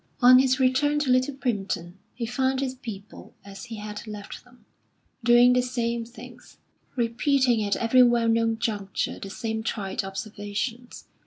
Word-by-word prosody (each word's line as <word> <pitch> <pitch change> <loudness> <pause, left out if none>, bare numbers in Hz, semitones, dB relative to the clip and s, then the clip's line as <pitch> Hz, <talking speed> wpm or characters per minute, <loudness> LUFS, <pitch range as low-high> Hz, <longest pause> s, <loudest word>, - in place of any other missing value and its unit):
On 255 0 +8
his 260 +1 +2
return 265 +3 +2
to 295 -3 +1
Little 255 +2 +2
Primpton, 195 -9 -3 0.2
he 235 - -3
found 260 +2 0
his 265 -1 -2
people 215 -6 -10
as 195 -1 -10
he 230 -2 -8
had 210 +1 -7
left 210 -1 -8
them, 245 -3 -23 0.6
doing 240 +1 +6
the 250 - +3
same 235 -2 -2
things, 240 +2 -14 0.4
repeating 245 0 +1
at 200 -1 0
every 235 +2 +4
well 240 -1 +4
known 225 0 +2
juncture 205 -4 -3
the 195 - -7
same 220 +2 -4
trite 205 -3 -3
observations. 205 +5 -5
235 Hz, 155 wpm, -25 LUFS, 210-255 Hz, 0.6 s, On